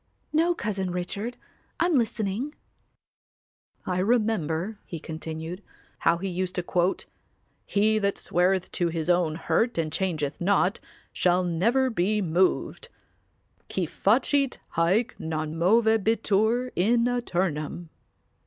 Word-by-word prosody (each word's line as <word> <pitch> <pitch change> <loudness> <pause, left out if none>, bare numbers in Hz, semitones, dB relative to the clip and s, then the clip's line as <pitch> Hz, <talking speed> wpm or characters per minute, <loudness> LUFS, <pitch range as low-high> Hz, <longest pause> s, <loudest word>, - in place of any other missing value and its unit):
"No, 335 +3 +3
Cousin 200 - -2
Richard, 200 +7 -4 0.4
I'm 345 -1 +3
listening." 230 +3 -1 1.3
"I 180 0 -1
remember," 205 -3 0
he 165 - -7
continued, 160 +3 -6 0.4
"how 170 - +3
he 195 +3 -4
used 185 0 -3
to 180 - -1
quote 180 +1 0 0.6
'He 215 +2 +2
that 200 -1 0
sweareth 185 +1 +1
to 175 - 0
his 165 0 0
own 175 -3 +2
hurt 225 +6 0
and 155 -2 -1
changeth 160 -6 -2
not 195 +2 +2 0.3
shall 180 0 +2
never 230 +10 +2
be 210 +1 +1
moved,' 185 - 0 0.8
'qui 185 - 0
facit 255 - +1 0.2
haec 195 +9 +2
non 155 -1 -3
movebitur 220 +4 +2
in 230 +6 +3
aeternum. 175 -9 -2
190 Hz, 115 wpm, -26 LUFS, 175-225 Hz, 1.3 s, No